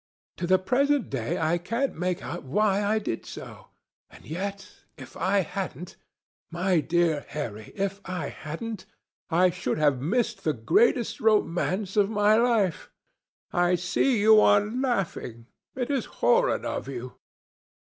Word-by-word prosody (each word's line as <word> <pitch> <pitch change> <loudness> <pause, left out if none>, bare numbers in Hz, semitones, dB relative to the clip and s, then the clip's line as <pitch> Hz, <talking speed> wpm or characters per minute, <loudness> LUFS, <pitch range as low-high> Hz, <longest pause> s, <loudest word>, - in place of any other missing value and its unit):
To 175 - -3
the 185 +1 +5
present 275 +8 +1
day 120 -4 -2
I 165 +2 +1
can't 230 +10 -1
make 180 +1 -2
out - - -5
why 200 +8 +1
I 210 +2 +1
did 200 - -3
so; - - -10 0.4
and - - -16
yet 195 +5 -5 0.3
if 135 - -12
I 195 +3 +2
hadn't—my 180 0 -4
dear 165 -2 +1
Harry, 110 -8 -6
if 195 0 -2
I 185 -3 -4
hadn't—I 180 0 -3
should 180 -2 -3
have 145 -4 +2
missed 215 - -1
the 155 - +1
greatest 220 - +2
romance 200 -2 +1
of 205 -1 +4
my 210 0 +3
life. 225 -7 +1 0.6
I 175 0 +3
see 180 +8 +1
you 215 +1 +7
are 205 -1 +5
laughing. 205 - -3 0.3
It 255 +1 -2
is 270 -4 0
horrid - - +1
of - - -3
you!" 125 -2 -7
190 Hz, 140 wpm, -26 LUFS, 165-215 Hz, 0.6 s, you